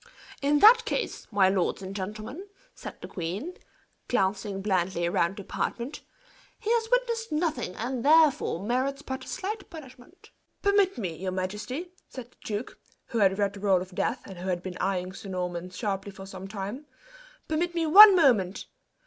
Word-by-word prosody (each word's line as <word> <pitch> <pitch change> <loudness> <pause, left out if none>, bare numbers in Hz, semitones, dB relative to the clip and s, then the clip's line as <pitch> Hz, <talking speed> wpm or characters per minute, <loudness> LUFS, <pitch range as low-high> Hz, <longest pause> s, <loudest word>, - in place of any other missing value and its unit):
"In 290 +1 +3
that 450 +4 +8
case, - - -3
my 200 -2 +4
lords 190 0 0
and 190 +1 -7
gentlemen," 215 - -6 0.3
said - - -9
the - - -7
queen, 195 - -5 0.5
glancing 195 -2 0
blandly 185 -3 0
round 170 +2 0
the 200 - -7
apartment, 245 +8 -4 0.6
"he 450 0 -3
has 460 -1 +1
witnessed 470 -2 0
nothing, 300 - -1
and, 240 +1 -3
therefore, 300 - +4
merits 260 +4 -1
but 265 0 -5
slight 420 +3 -5
punishment." 315 +1 -13 0.3
"Permit 400 -4 +3
me, 180 -8 -3
your 185 +3 -4
majesty," 210 - -4 0.2
said 250 -2 -9
the - - -29
duke, 210 +3 -5 0.3
who 230 - -1
had 195 -2 +3
read 200 -1 0
the 205 - -10
roll 195 -2 +3
of 185 +1 -8
death, - - -1
and 190 -3 -10
who 185 +2 -4
had 175 -1 -2
been 180 -1 -6
eyeing 185 -1 -1
Sir 195 - -9
Norman 180 -1 -4
sharply 195 0 -4
for 195 0 -10
some 190 0 -8
time, 205 +8 -6 0.6
"permit 340 +3 -1
me 335 -1 +1
one 400 +5 +10
moment! 225 - +3
210 Hz, 170 wpm, -27 LUFS, 190-310 Hz, 0.6 s, one